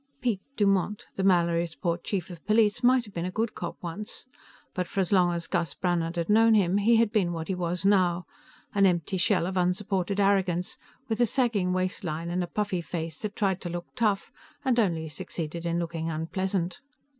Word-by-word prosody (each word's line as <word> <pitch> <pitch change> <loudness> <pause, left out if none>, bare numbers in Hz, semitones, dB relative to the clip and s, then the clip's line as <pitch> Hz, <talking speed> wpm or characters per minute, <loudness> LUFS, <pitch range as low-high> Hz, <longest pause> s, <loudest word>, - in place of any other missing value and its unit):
Piet 235 -6 0 0.2
Dumont, 200 -1 +1
the - - -3
Mallorysport 170 -2 +1
chief 185 -3 -3
of 170 -2 -10
police, 215 +1 +3
might 250 0 +4
have 205 - -14
been 170 - -3
a 180 - -1
good 220 +4 -1
cop 175 - -5
once, 185 +5 -6 0.5
but 180 -1 -2
for - - -3
as 190 0 0
long 180 -3 +4
as 170 -1 -3
Gus 170 -5 -1
Brannhard 175 -2 0
had 170 -1 -1
known 225 +1 +5
him, 190 -2 +3
he 225 +3 +4
had 225 -2 +3
been 190 -6 +1
what 165 -1 -4
he - - +1
was 180 0 -2
now 180 -3 +3 0.5
an 200 -1 +5
empty 175 +1 0
shell 175 -1 +2
of 185 +1 -3
unsupported 190 +1 0
arrogance, 190 -3 +2 0.3
with 225 -1 -1
a 240 - +5
sagging 215 -7 +1
waistline 175 -3 -2
and 180 +1 0
a - - -4
puffy 205 -2 -1
face 160 -1 -5
that 215 -1 -4
tried 190 -2 0
to 175 - -4
look 175 0 -4
tough 215 -5 0 0.3
and 250 -2 +3
only 165 -7 +1
succeeded 165 +2 -5
in 170 0 0
looking 165 -1 -2
unpleasant. 175 +3 -2
185 Hz, 195 wpm, -27 LUFS, 170-205 Hz, 0.5 s, known